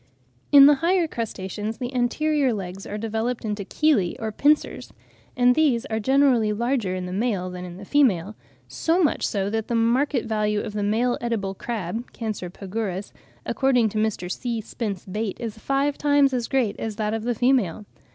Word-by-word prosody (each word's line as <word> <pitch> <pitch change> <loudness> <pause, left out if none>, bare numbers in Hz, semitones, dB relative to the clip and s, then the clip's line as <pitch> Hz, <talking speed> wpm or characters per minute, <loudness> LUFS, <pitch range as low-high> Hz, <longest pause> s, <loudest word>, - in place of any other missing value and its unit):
] 120 -1 -38
In 275 - +11
the 295 - +8
higher 350 0 +2
crustaceans 215 - -4
the 250 0 -5
anterior 270 +2 +1
legs 190 -1 -6
are 210 - -4
developed 225 +2 -2
into 210 -1 -3
chelae 215 - +1
or 220 -1 -4
pincers; 295 +7 +1 0.5
and 250 0 +5
these 265 -5 +2
are 220 - 0
generally 260 -3 +3
larger 230 -3 -1
in 185 -1 -4
the 180 - -5
male 195 -4 -1
than 180 0 -7
in 175 0 -9
the 200 - -10
female,—so 265 - 0
much 300 - +1
so 195 -2 -1
that 220 -1 -2
the 235 - -1
market 245 +3 +2
value 210 -1 0
of 210 - -6
the 210 - -2
male 225 +4 +1
edible 220 -5 -2
crab 225 +1 -5
(Cancer 215 -6 -4
pagurus), 195 +1 -5 0.3
according 250 -5 +2
to 215 - -3
Mr. 215 -4 -1
C. 235 0 -3
Spence 210 -3 -5
Bate, 210 +2 -4
is 225 -2 -5
five 275 +3 0
times 285 -2 +3
as 245 -2 -1
great 255 -6 0
as 220 -2 -4
that 215 0 -1
of 225 -1 -2
the 240 0 -1
female. 225 -6 +1
225 Hz, 180 wpm, -24 LUFS, 205-255 Hz, 0.5 s, In